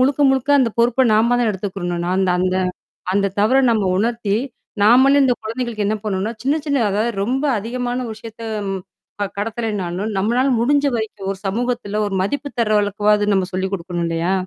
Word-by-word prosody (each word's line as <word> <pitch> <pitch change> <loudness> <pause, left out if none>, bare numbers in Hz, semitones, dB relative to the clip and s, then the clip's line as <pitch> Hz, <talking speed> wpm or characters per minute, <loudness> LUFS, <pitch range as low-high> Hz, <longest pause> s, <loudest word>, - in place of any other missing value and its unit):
முழுக்க, 275 +2 +2
முழுக்க 265 +1 0
அந்த 240 -3 +2
பொறுப்ப 240 +2 +3
நாம 235 +3 +3
தான் 235 - +2
எடுத்துக்கிறணும். 185 -3 -3
நான் 185 - 0
அந்த 190 -1 +2
அந்த 185 0 +1 0.6
அந்த 200 0 +2
தவற 220 +6 +4
நம்ம 215 -3 +1
உணர்த்தி, 225 -1 0 0.5
நாமளே 265 +6 +6
இந்த 255 -2 +3
குழந்தைகளுக்கு 225 -2 -3
என்ன 215 - +1
பண்ணுன்னா, 205 +1 -2
சின்ன, 280 +3 +2
சின்ன 280 -4 +1
அதாவது 215 +4 0
ரொம்ப 260 +6 -1 0.2
அதிகமான 245 +3 -3
விஷயத்த 225 +1 -11 0.8
அ - - 0
கடத்தலனாலும், 210 -3 -3
நம்மனால 240 +7 +2
முடிஞ்ச 285 +4 +2
வரைக்கும் 210 -3 -4
ஒரு 190 - -13
சமூகத்துல 220 -1 -2
ஒரு 195 - -3
மதிப்பு 285 +8 -2
தர்ற 215 -2 +3
அளவுக்காவாது 205 0 +2
நம்ம 190 -1 0
சொல்லிக் 190 +1 -2
குடுக்கணும், 175 -1 -4
இல்லயா! 165 +2 0
215 Hz, 165 wpm, -20 LUFS, 195-245 Hz, 0.8 s, நாமளே